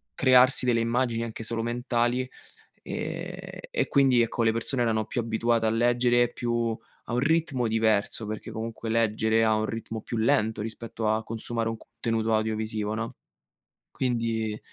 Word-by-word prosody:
crearsi 130 Hz, 0 st, +6 dB
delle 115 Hz, -2 st, +2 dB
immagini 115 Hz, 0 st, 0 dB
anche 115 Hz, 0 st, -6 dB
solo 115 Hz, +1 st, -2 dB
mentali, 120 Hz, +1 st, 0 dB, 0.5 s
ehm, -, -, -6 dB
e -, -, 0 dB
quindi, 135 Hz, -4 st, +4 dB
ecco, 115 Hz, 0 st, 0 dB
le 115 Hz, -, +4 dB
persone 120 Hz, +2 st, +1 dB
erano 110 Hz, -2 st, 0 dB
più 120 Hz, -, -2 dB
abituate 115 Hz, 0 st, 0 dB
a -, -, +3 dB
leggere, 120 Hz, +1 st, +3 dB
più 120 Hz, -2 st, -1 dB, 0.3 s
a -, -, -4 dB
un 120 Hz, -, +2 dB
ritmo 140 Hz, -4 st, +1 dB
diverso, 110 Hz, 0 st, +1 dB
perché 110 Hz, +1 st, -6 dB
comunque 115 Hz, 0 st, -5 dB
leggere 110 Hz, 0 st, +2 dB
ha 110 Hz, -, +3 dB
un 110 Hz, -, 0 dB
ritmo 115 Hz, 0 st, -5 dB
più 115 Hz, -, -5 dB
lento 110 Hz, -3 st, +1 dB
rispetto 115 Hz, 0 st, -4 dB
a 110 Hz, +1 st, +1 dB
consumare 115 Hz, 0 st, -3 dB
un 115 Hz, -, -4 dB
contenuto 115 Hz, -1 st, -2 dB
audiovisivo, 110 Hz, -1 st, -1 dB
no? 115 Hz, +1 st, -4 dB, 0.8 s
Quindi 115 Hz, -4 st, -1 dB
115 Hz, 155 wpm, -27 LUFS, 110-120 Hz, 0.8 s, crearsi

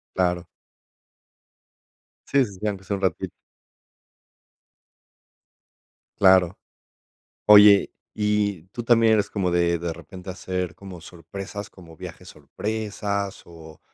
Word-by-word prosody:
Claro. 90 Hz, -1 st, 0 dB, 1.8 s
Sí, 140 Hz, -1 st, +3 dB
sí, 100 Hz, -5 st, -9 dB
sí, 105 Hz, -, -3 dB
aunque 100 Hz, -2 st, -3 dB
sea 100 Hz, -, -2 dB
un 100 Hz, -, -9 dB
ratito. 90 Hz, -4 st, -1 dB, 2.9 s
Claro. 95 Hz, -2 st, +5 dB, 0.9 s
Oye, 105 Hz, -1 st, +8 dB, 0.2 s
¿y 105 Hz, -4 st, 0 dB
tú 120 Hz, +4 st, -7 dB
también 115 Hz, -2 st, +5 dB
eres 105 Hz, -2 st, +1 dB
como 95 Hz, -4 st, -1 dB
de 85 Hz, -1 st, +2 dB
de 85 Hz, 0 st, -3 dB
repente 90 Hz, +3 st, -10 dB
hacer 90 Hz, -1 st, -4 dB
como 95 Hz, -3 st, -10 dB
sorpresas, 100 Hz, +4 st, -8 dB
como 85 Hz, -3 st, -15 dB
viajes -, -, -10 dB
sorpresas, 105 Hz, -2 st, -4 dB
o 80 Hz, -2 st, -14 dB
95 Hz, 110 wpm, -24 LUFS, 90-105 Hz, 2.9 s, Oye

